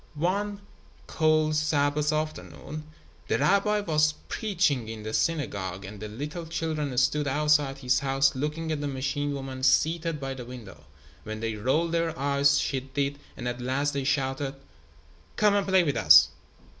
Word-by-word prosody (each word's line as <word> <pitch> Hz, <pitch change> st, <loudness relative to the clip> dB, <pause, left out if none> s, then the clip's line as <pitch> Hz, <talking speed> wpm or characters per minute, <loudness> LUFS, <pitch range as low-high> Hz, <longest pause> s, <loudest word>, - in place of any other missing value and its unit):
One 200 Hz, +6 st, -1 dB, 0.4 s
cold 155 Hz, -1 st, +2 dB
Sabbath 150 Hz, 0 st, +1 dB
afternoon, 155 Hz, 0 st, -5 dB, 0.4 s
the -, -, +1 dB
rabbi 205 Hz, +2 st, +2 dB
was 155 Hz, -4 st, +2 dB
preaching 165 Hz, -, 0 dB
in 110 Hz, -1 st, -7 dB
the 110 Hz, 0 st, -5 dB
synagogue 100 Hz, -, -1 dB
and 100 Hz, +1 st, -9 dB
the 105 Hz, -, -6 dB
little 150 Hz, +10 st, -6 dB
children 155 Hz, -5 st, -3 dB
stood 140 Hz, +3 st, +2 dB
outside 150 Hz, -1 st, +2 dB
his 125 Hz, -1 st, +1 dB
house 135 Hz, 0 st, +2 dB
looking 150 Hz, +4 st, -3 dB
at 150 Hz, -2 st, -2 dB
the 145 Hz, -, -2 dB
machine 140 Hz, +2 st, -2 dB
woman 135 Hz, -2 st, -5 dB
seated 160 Hz, +3 st, +2 dB
by 135 Hz, -1 st, -4 dB
the 130 Hz, -2 st, -7 dB
window. 115 Hz, -, -11 dB, 0.4 s
When 110 Hz, 0 st, -6 dB
they 115 Hz, 0 st, -2 dB
rolled 135 Hz, +10 st, 0 dB
their 165 Hz, -1 st, -1 dB
eyes 140 Hz, +1 st, +3 dB
she 135 Hz, -, -1 dB
did, 140 Hz, +2 st, -3 dB, 0.2 s
and 125 Hz, -, -5 dB
at 120 Hz, 0 st, -4 dB
last 135 Hz, +4 st, 0 dB
they 140 Hz, -1 st, -2 dB
shouted: 135 Hz, 0 st, -1 dB, 0.8 s
"Come 210 Hz, -1 st, +3 dB
and 200 Hz, -1 st, +1 dB
play 190 Hz, -1 st, +4 dB
with 145 Hz, -7 st, -1 dB
us." 75 Hz, -1 st, +8 dB
145 Hz, 160 wpm, -27 LUFS, 130-155 Hz, 0.8 s, us